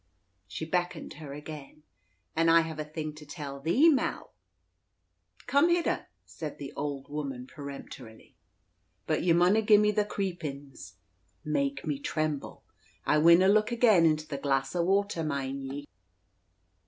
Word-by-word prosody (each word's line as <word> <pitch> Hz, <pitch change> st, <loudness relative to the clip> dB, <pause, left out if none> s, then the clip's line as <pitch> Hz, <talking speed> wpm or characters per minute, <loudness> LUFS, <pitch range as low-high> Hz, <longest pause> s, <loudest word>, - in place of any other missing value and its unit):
She 160 Hz, -, -5 dB
beckoned 175 Hz, +2 st, -2 dB
her 145 Hz, -3 st, -8 dB
again. 150 Hz, 0 st, -9 dB, 0.5 s
"An' 165 Hz, +1 st, +3 dB
I 165 Hz, 0 st, +7 dB
hev 160 Hz, -1 st, -6 dB
a -, -, -1 dB
thing 155 Hz, 0 st, -5 dB
to 150 Hz, 0 st, -12 dB
tell 145 Hz, -2 st, -7 dB
thee, 175 Hz, -, +4 dB
Mall." 295 Hz, -5 st, +1 dB, 1.1 s
"Come 285 Hz, +5 st, +4 dB
hidder," 345 Hz, 0 st, 0 dB, 0.2 s
said 155 Hz, -3 st, -7 dB
the 140 Hz, -, -8 dB
old 140 Hz, -1 st, -4 dB
woman 140 Hz, -4 st, -5 dB
peremptorily. 140 Hz, -5 st, -10 dB, 0.7 s
"But -, -, 0 dB
ye 175 Hz, -, +2 dB
munna 180 Hz, +6 st, +4 dB
gie 210 Hz, -1 st, +6 dB
me 210 Hz, 0 st, +3 dB
the 210 Hz, 0 st, +1 dB
creepin's" 150 Hz, -, -5 dB, 0.5 s
(make 140 Hz, -2 st, -1 dB
me 145 Hz, -3 st, -2 dB
tremble). 155 Hz, -1 st, -3 dB, 0.4 s
"I 150 Hz, -, +3 dB
winna 170 Hz, +4 st, +6 dB
look 215 Hz, +3 st, +3 dB
again 220 Hz, -8 st, +5 dB
into 155 Hz, 0 st, 0 dB
the 140 Hz, -, -5 dB
glass 135 Hz, +1 st, 0 dB
o' 175 Hz, -, +2 dB
water, 195 Hz, -1 st, +1 dB
mind 140 Hz, -2 st, -3 dB
ye." 140 Hz, +2 st, -6 dB
155 Hz, 145 wpm, -29 LUFS, 140-180 Hz, 1.1 s, I